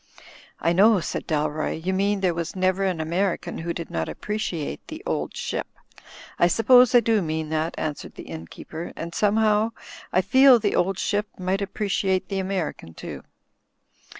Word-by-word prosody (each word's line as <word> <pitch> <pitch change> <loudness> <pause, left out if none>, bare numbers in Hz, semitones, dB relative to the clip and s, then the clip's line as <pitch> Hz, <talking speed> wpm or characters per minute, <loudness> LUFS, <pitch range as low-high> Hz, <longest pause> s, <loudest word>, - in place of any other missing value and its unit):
"I 170 - +2
know,*' 205 +3 +5
said - - -4
Dalroy, 155 0 -1
"you 190 - +1
mean 200 +1 +1
there 185 -3 +2
was 170 +1 -4
never 185 +1 +1
an 185 -4 0
American 175 +4 -1
who 170 +1 -3
did 170 -1 -6
not - - -2
appreciate 185 - -4
'The - - -8
Old - - -2
Ship.* - - -3 0.4
" - - -17
"I 175 - +6
suppose 245 +6 +5
I 240 - +8
do 225 -2 +2
mean 160 -2 -3
that," 160 +1 -1
answered 150 -2 -4
the - - -8
inn 80 0 -8
keeper, 165 - -8
"and 170 +1 -6
somehow, 215 +2 +2 0.4
I 185 - +3
feel 260 +4 +6
*The 225 - 0
Old 190 +1 +1
Ship' 205 +2 -1
might 185 +2 -1
appreciate 195 -1 -1
the 195 -1 -1
American 185 - -3
too." - - -7
185 Hz, 175 wpm, -24 LUFS, 165-205 Hz, 0.4 s, I